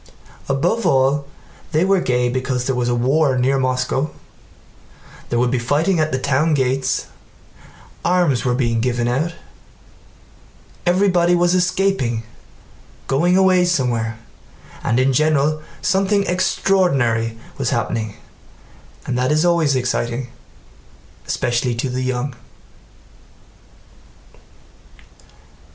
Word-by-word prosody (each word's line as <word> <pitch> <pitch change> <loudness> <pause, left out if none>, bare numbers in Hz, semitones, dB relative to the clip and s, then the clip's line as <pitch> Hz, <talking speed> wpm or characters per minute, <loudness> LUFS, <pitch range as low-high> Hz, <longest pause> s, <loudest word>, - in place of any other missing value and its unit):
Above 175 +12 0
all, 135 +2 +2 0.5
they 155 +4 +3
were 195 -1 +2
gay 125 -3 +1
because 125 0 -2
there 135 - 0
was 120 -1 0
a 120 - +1
war 135 +3 +2
near 135 +2 +2
Moscow, 130 +3 0 1.2
there 120 - 0
would 120 0 +1
be 130 - +1
fighting 155 +9 +1
at 155 0 +1
the 130 - 0
town 140 +4 +1
gates, 130 0 0 1.0
arms 175 -8 +2
were 125 -1 +1
being 115 -3 0
given 120 -1 0
out, 155 +8 -1 1.5
everybody 180 -1 +3
was 175 0 +2
escaping—going 175 - -2
away 185 -1 +4
somewhere, 120 -10 0 0.7
and 120 +1 +1
in 130 +1 +2
general 155 +1 +2 0.2
something 195 +1 +2
extraordinary 135 -12 +1 0.2
was - - 0
happening, 110 -3 -2 0.9
and 130 - -2
that 130 +3 +1
is 155 +3 +2
always 165 -5 +2
exciting, 125 0 -2 1.0
especially 120 0 -1
to 120 +3 -2
the 130 +1 -2
young. 130 +1 -2
135 Hz, 105 wpm, -19 LUFS, 125-170 Hz, 1.5 s, away